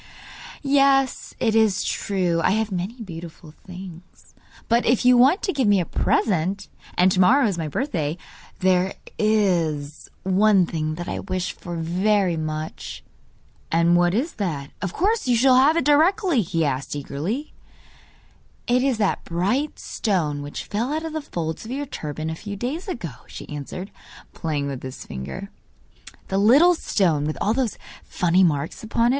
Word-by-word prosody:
'Yes, 275 -1 +2
it 225 -2 +1
is 220 -4 +3
true 180 -4 0
I - - +3
have 220 0 0
many 190 +7 -4
beautiful 165 -3 -9 0.2
things; 180 -1 -11 0.3
but 235 +1 +3
if 245 +1 +2
you 250 0 +7
want 265 - +5
to 380 - 0
give 265 -6 +1
me 205 -1 +4
a 175 - 0
present 195 -1 0 0.3
and 185 +1 +5
to 185 - +1
morrow 255 +9 +5
is 200 -4 0
my 160 - -2
birthday 160 - -2 0.4
there 185 0 +2 0.2
IS 170 -9 0
one 190 0 +4
thing 155 -2 -3
that 175 +1 -6
I - - -3
wish 185 -2 -3
for 175 -1 -7
very 180 +3 +1
much.' 155 0 -5 0.7
'And 170 +1 +4
what 175 +1 +3
is 285 +9 -1
that? 145 -7 -3
Of 195 - -2
course 410 - 0
you 245 - +4
shall 255 +2 +5
have 290 +5 +5
it 335 - +1
directly!' 325 - +3
he 165 -3 -1
asked 135 0 -2
eagerly. 165 - -4 1.1
'It 245 +1 +2
is 265 -3 +1
that 205 -3 0
bright 205 - -1
stone 160 -9 -1
which 145 0 -6
fell 230 +6 -2
out 315 +2 -2
of 320 - -5
the 315 - -2
folds 160 - -4
of 220 - -9
your 280 +3 -3
turban 155 - -5
a - - -3
few 205 +4 -7
days 265 - -4
ago,' 170 - -6
she - - -9
answered, 150 +7 -6 0.4
playing 150 -4 -2
with 140 -2 -4
his 130 -1 -8
finger; 185 - -7 0.8
'the 195 - +1
little 280 - +6
stone 175 - +1
with 155 +1 -2
all 215 - +1
those 245 -4 -1 0.3
funny 180 +1 +2
marks 150 -3 0
upon 230 +1 0
it. - - +4
190 Hz, 170 wpm, -23 LUFS, 165-245 Hz, 1.1 s, you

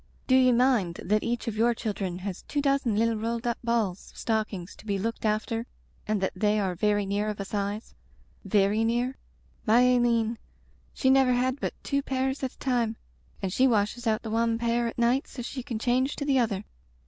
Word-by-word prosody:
Do 255 - +1
ye 255 -1 +6
mind 240 -8 +3
that 210 +3 +2
each 235 0 -2
of 225 - -2
your 235 +2 +3
children 195 -5 -3
has 195 -3 -4
two 290 - -3
dozen 275 -5 +1
little 225 +1 +2
rolled 230 +2 -3
up 235 -1 -1
balls 225 -6 -1
of - - -19
stockings 215 -6 -2
to - - -15
be 200 -1 0
looked 230 +3 -3
after 220 +2 -1 0.4
and 215 -1 +1
that 190 - 0
they 210 +2 +2
are 190 -3 0
very 205 +2 +1
near 205 +2 -1
of 210 - -5
a 195 - -3
size 205 +2 -3 0.3
— - - -18
^very 205 +2 +3
near? 240 +3 0 0.5
My 230 +3 +6
Aileen 235 -2 +2 0.3
— - - -34
she 260 - +3
never 265 -1 +5
had 255 +2 0
but - - -3
two 280 -1 0
pairs 265 0 -1
at 260 -2 -3
a - - -26
time 240 -4 0 0.5
and 185 -1 -1
she 260 +4 +4
washes 230 +1 0
out 220 -1 +1
the 220 - -5
wan 230 0 +1
pair 235 0 +1
at 230 - -6
night 240 +3 +2
so 245 - -7
she 255 +2 -5
can 240 -3 -4
change 255 +4 +1
to 285 - -4
the 275 -2 +3
other. 215 -4 0
230 Hz, 215 wpm, -27 LUFS, 210-250 Hz, 0.5 s, ye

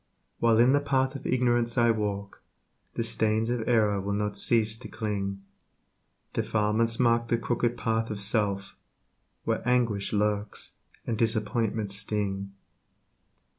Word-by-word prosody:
While 115 -1 +4
in 120 +3 +5
the 145 - +4
path 135 -2 0
of 140 - -6
ignorance 120 -1 +1
I 120 -1 +5
walk, 100 -2 -3 0.5
The 115 - 0
stains 110 0 0
of 120 -2 -2
error 105 -4 +3
will 100 +1 -2
not 105 0 -2
cease 110 +1 +2
to - - -8
cling 100 -3 -3 0.9
Defilements 110 +2 +1
mark 115 -1 +3
the 115 - +1
crooked 120 +1 -1
path 115 0 -1
of 105 - -4
self, 100 -2 +1 0.7
Where - - -1
anguish 120 -5 +1
lurks 105 0 -1 0.3
and 115 -1 -2
disappointments 110 -2 0
sting. 100 -2 -2
110 Hz, 135 wpm, -27 LUFS, 105-115 Hz, 0.9 s, in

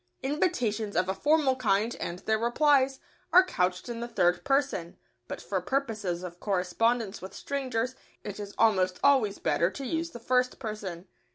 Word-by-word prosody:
Invitations 240 - 0
of 185 +1 +2
a - - +1
formal 290 +5 +2
kind, 220 -2 +1
and 170 - -4
their 220 +4 0
replies, 270 +2 +3 0.3
are 370 +1 +7
couched 180 - -1
in 235 -1 -5
the 235 - -4
third 175 -6 +1
person, 270 -11 0 0.3
but - - -6
for - - -2
purposes 215 -10 -2
of 175 -1 -8
correspondence 205 +3 0
with 190 - -9
strangers 255 -3 -2 0.3
it 205 0 -6
is 205 -1 -7
almost 185 -5 +3
always 255 -8 +4
better 170 - +1
to 275 +7 -7
use 330 +5 -2
the 240 - -10
first 250 +2 +1
person. 205 -7 -6
225 Hz, 165 wpm, -28 LUFS, 190-265 Hz, 0.3 s, are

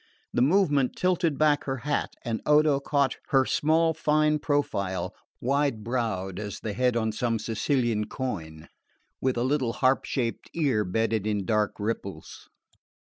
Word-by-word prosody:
The - - +1
movement 145 -3 +3
tilted 180 -5 +1
back 150 -1 +3
her 135 -1 -2
hat, 145 - -1
and 115 -2 -2
Odo 150 -1 +4
caught 140 -1 0
her 135 -1 +3
small 160 +4 +2
fine 150 0 +2
profile, 100 -11 -1 0.3
wide 135 -3 0
browed 110 -6 -2
as 105 -2 -5
the 110 - -4
head 125 +2 +1
on 110 -1 0
some 115 +1 -1
Sicilian 115 0 0
coin, 80 -11 -5 0.5
with 130 -2 0
a 120 - +1
little 130 -3 0
harp 130 +2 +2
shaped 120 -4 -3
ear 135 -10 +2
bedded 110 +2 0
in 105 -3 -1
dark 105 0 +1
ripples. 105 -2 -5
125 Hz, 145 wpm, -27 LUFS, 110-145 Hz, 0.5 s, Odo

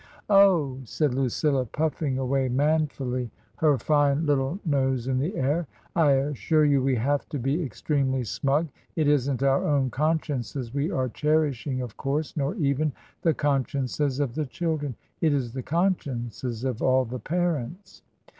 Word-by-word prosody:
"Oh!" 175 -10 +5
said 145 +2 0
Lucilla, 135 +1 +1
puffing 145 +1 -1
away 130 0 0
manfully, 135 -3 0 0.3
her 150 -3 +3
fine 145 +2 +2
little 140 +2 +1
nose 135 -5 +1
in 130 -1 +1
the 165 +10 -2
air, 145 +5 0 0.2
" - - -33
I 155 -4 +5
assure 145 +3 +2
you 140 -2 +3
we 135 0 +2
have 140 +5 0
to 145 - -3
be 135 +7 0
ex 130 -8 -8
tremely 135 -4 +1
smug. 140 +7 0 0.3
It 155 -3 +1
isn't 140 -2 +2
our 135 0 +3
own 140 -4 +1
consciences 140 -4 -1
we 145 +2 0
are 130 -1 0
cherishing, 145 -2 0
of 120 -4 -8
course, 145 +3 -2
nor 145 +4 -1
even 150 -4 0 0.3
the 165 -3 +2
consciences 140 -1 0
of 140 -5 0
the 150 +1 -2
children. 150 -4 -2 0.3
It's 140 -7 +1
the 130 +2 -4
consciences 130 - -2
of 130 -4 -2
all 130 0 +3
the 125 +2 -5
parents." 175 - -3
140 Hz, 155 wpm, -26 LUFS, 130-155 Hz, 0.3 s, Oh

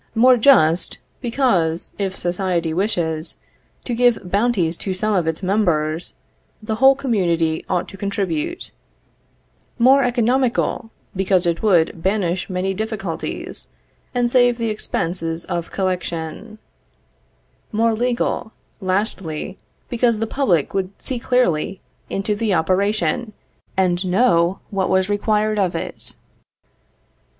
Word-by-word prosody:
More 250 +3 +6
just, 200 - +4 0.2
because, 225 -10 0
if 190 -2 -2
society 175 -2 -1
wishes 165 -4 -1 0.5
to 245 - -2
give 235 -6 +2
bounties 200 -6 +1
to 190 -2 -3
some 215 +3 0
of 175 -5 +1
its 160 +4 -2
members, 170 -5 0 0.4
the 220 0 -3
whole 265 +3 +6
community 175 -11 0
ought 180 0 0
to 195 - -10
contribute; 200 - -3 1.1
more 260 +3 +6
economical, 245 -1 +1 0.3
because 190 -1 +2
it 170 -1 0
would 175 -5 +2
banish 190 -2 0
many 185 +1 -1
difficulties, 205 -4 -4 0.4
and 245 -1 0
save 245 -2 +4
the 230 -2 -1
expenses 165 -4 -3
of 170 -1 -3
collection; 185 +2 -3 1.1
more 225 +1 +2
legal, 235 -1 -1 0.3
lastly, 185 -3 -2 0.3
because 235 -1 +1
the 225 - -1
public 210 - +1
would 195 0 -3
see 255 -3 -4
clearly 195 -8 +1 0.3
into 195 +2 -1
the 210 -2 0
operation, 200 +4 0 0.4
and 180 -1 +2
know 185 -2 +2
what 195 -2 0
was 190 +1 +2
required 210 +1 +1
of 185 -3 +1
it. - - -6
195 Hz, 115 wpm, -20 LUFS, 175-230 Hz, 1.1 s, More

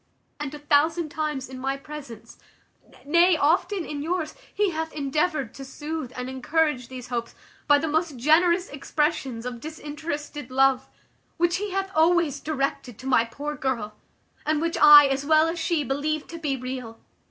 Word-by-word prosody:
And 295 -2 -4
a - - -7
thousand 305 +3 +2
times 300 -3 -3
in 260 0 -9
my 270 +1 -2
presence, 280 -6 -10 0.7
nay, 340 +3 +4
often 335 +5 +1
in 290 -1 -5
yours, 330 +1 -2 0.2
he 415 -2 +1
hath 320 0 -3
endeavoured 290 -2 -1
to 275 - -9
soothe 295 0 -6
and 250 0 -4
encourage 265 0 0
these 255 -1 -9
hopes 235 -2 -4 0.3
by 290 - +6
the 320 +3 -2
most 315 -2 -1
generous 340 +7 +3
expressions 275 -4 -2
of 245 -1 -5
disinterested 295 -2 -6
love, 265 0 +3 0.5
which 345 0 +2
he 415 +2 -3
hath 385 0 -2
always 330 -3 +3
directed 275 -6 -3
to 255 - -12
my 250 -3 +3
poor 290 +6 -5
girl, 240 -6 -2 0.5
and 310 0 +1
which 335 +1 -1
I, 295 -1 +9
as 270 0 0
well 310 +2 +4
as 330 +1 -3
she, 320 -2 0
believed 290 +4 -2
to 335 - -7
be 285 -4 -1
real. 250 -3 -6
295 Hz, 165 wpm, -25 LUFS, 265-320 Hz, 0.7 s, I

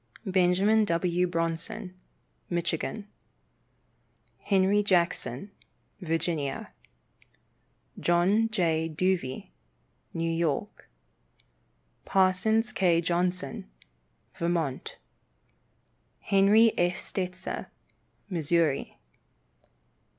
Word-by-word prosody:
Benjamin 190 +3 +3
W. 175 0 +1
Bronson, 165 +3 -3 0.6
Michigan. 175 +4 -2 1.3
Henry 195 +1 +2
Jackson, 175 - 0 0.5
Virginia. 165 -4 -2 1.3
John 190 +6 +2
J. 165 -6 0
Duvey, 160 - -1 0.6
New 165 0 -2
York. 165 +3 -2 1.1
Parsons 195 +5 +2
K. 175 -3 +3
Johnson, 175 - -2 0.6
Vermont. 170 -6 -2 1.2
Henry 210 +3 +4
F. 175 +1 +2
Stetzer, 185 0 -4 0.6
Missouri. 165 -3 0
175 Hz, 60 wpm, -28 LUFS, 165-195 Hz, 1.3 s, Henry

